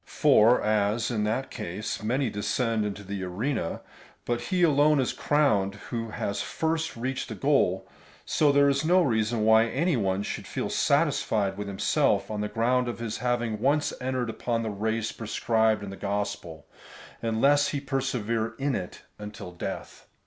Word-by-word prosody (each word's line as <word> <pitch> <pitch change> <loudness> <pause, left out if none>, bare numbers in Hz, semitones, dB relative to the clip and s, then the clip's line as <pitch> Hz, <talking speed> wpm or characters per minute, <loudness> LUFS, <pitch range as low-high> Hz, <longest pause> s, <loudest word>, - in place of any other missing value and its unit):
^ - - -44
For 115 +4 +4
as 110 +2 +1
in 105 -3 0
that 115 +5 -2
case 105 -1 -5
many 120 +3 0
descend 110 +1 -1
into 105 0 -6
the 100 0 -5
arena, 100 +1 -2 0.4
but 120 0 -1
he 180 +9 0
alone 150 -1 +4
is 130 - 0
crowned 105 -10 +1 0.2
who 115 -2 -3
has 100 -1 -3
first 160 -3 -2
reached 130 +3 -3
the - - -5
goal, - - +1 0.4
so 150 -2 +3
there 140 0 +4
is 140 +1 +1
no 180 +3 +4
reason 110 -4 +1
wh}' 110 0 +6
any 170 -2 +1
one 100 -3 0
should - - -5
feel - - -3
satisfied 100 -3 +1
with 105 +1 -5
himself 100 +2 +1
on 105 -1 -2
the 105 - -1
ground 125 +2 +1
of 120 - -4
his 115 -2 -4
having 120 -3 -1
once 145 +5 +1
entered 125 -2 -1
upon 115 0 -2
the 110 - -2
race 110 +2 -2
prescribed 110 -1 0
in 100 - -6
the - - -7
gospel, 100 -5 -4 0.6
unless 140 +6 +3
he 145 - -2
persevere 125 -5 -2
in 140 0 -1
it 90 -6 -5 0.2
until 105 -3 -8
death. 90 - -7
115 Hz, 170 wpm, -27 LUFS, 105-135 Hz, 0.6 s, wh